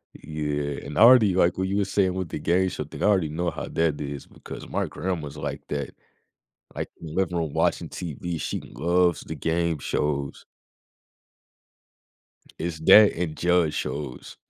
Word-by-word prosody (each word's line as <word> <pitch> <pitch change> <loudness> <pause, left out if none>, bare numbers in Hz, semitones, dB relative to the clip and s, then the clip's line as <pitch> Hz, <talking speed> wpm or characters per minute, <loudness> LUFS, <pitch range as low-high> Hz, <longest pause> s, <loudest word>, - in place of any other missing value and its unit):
Yeah, 75 -2 -3
and 75 - -7
I - - +3
already 115 -5 +7
like 90 0 +3
what 95 0 0
you 100 - -1
were 100 - +2
saying 95 -1 +1
with 95 -3 -3
the - - -4
game 90 +4 +2
show 90 - -4
thing, 75 - -7
I - - +3
already 95 -7 +3
know 85 +3 -2
how - - -6
that 80 -3 0
is 70 -1 -5
because - - -10
my - - -1
grandma's 80 -6 -4
like - - -4
that. 70 -2 -4 0.8
Like, - - -4
living 85 +2 -2
room 80 -4 -2
watching - - 0
TV, 85 0 -5
she - - -3
loves 85 +2 +1
the 80 - -7
game 80 +1 0
shows. 70 -1 -2 2.2
It's 85 -1 -3
that 105 +6 +8
and 80 -3 -3
judge 85 -2 +2
shows. 70 -3 -5
85 Hz, 165 wpm, -25 LUFS, 75-90 Hz, 2.2 s, that